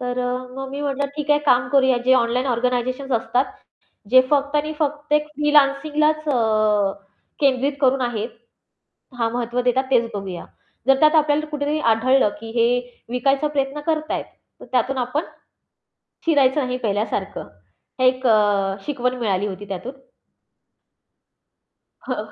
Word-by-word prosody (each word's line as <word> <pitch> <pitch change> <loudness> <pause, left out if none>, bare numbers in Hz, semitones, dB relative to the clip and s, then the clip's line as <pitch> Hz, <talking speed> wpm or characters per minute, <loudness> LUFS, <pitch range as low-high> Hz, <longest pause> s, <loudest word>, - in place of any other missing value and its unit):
तर 250 0 -3
अ, 245 0 -1 0.2
मग 270 0 -5
मी 280 +1 -5
म्हटलं 280 0 -1
ठीक 295 0 -3
आहे 295 - +5
काम 245 -1 +3
करूया 265 -2 +3
जे 260 - +6
ऑनलाईन 250 +2 +1
ऑर्गनायझेशन्स 250 +2 -1
असतात 245 +3 0 0.6
जे 255 - +8
फक्त 285 0 +1
आणि 305 +1 -1
फक्त 295 0 -2
एक 300 0 +2
फ्रीलान्सिंगलाच 295 +1 +2
अ, 215 -5 +2 0.5
केंद्रित 275 0 +2
करून 265 0 +3
आहेत 235 -2 -2 0.9
हां 230 -1 +1
महत्त्व 240 0 -2
देतात 250 +2 +1
तेच 235 -2 +2
बघूया. 195 -3 -5 0.4
जर 270 0 +5
त्यात 305 +1 +5
आपल्याला 305 0 +2
कुठेतरी 295 +1 -1
आढळलं 235 +1 +3
की 225 - -8
हे 230 - +4 0.4
विकायचा 270 +4 +1
प्रयत्न 280 0 -2
करतायेत. 310 -1 -1 0.4
तर - - -11
त्यातून 255 +2 +1
आपण 255 +6 -1 1.0
शिरायचं 285 -3 +3
नाही 250 0 -2
पहिल्यासारखं. 205 -3 -3 0.5
हे 255 - +3
एक 255 +1 +1 0.6
शिकवण 255 -3 -1
अ, - - -8
मिळाली 205 -3 0
होती 195 +1 -7
त्यातून. 200 +8 -5 2.1
हं. 215 -4 -4
260 Hz, 140 wpm, -21 LUFS, 240-290 Hz, 2.1 s, जे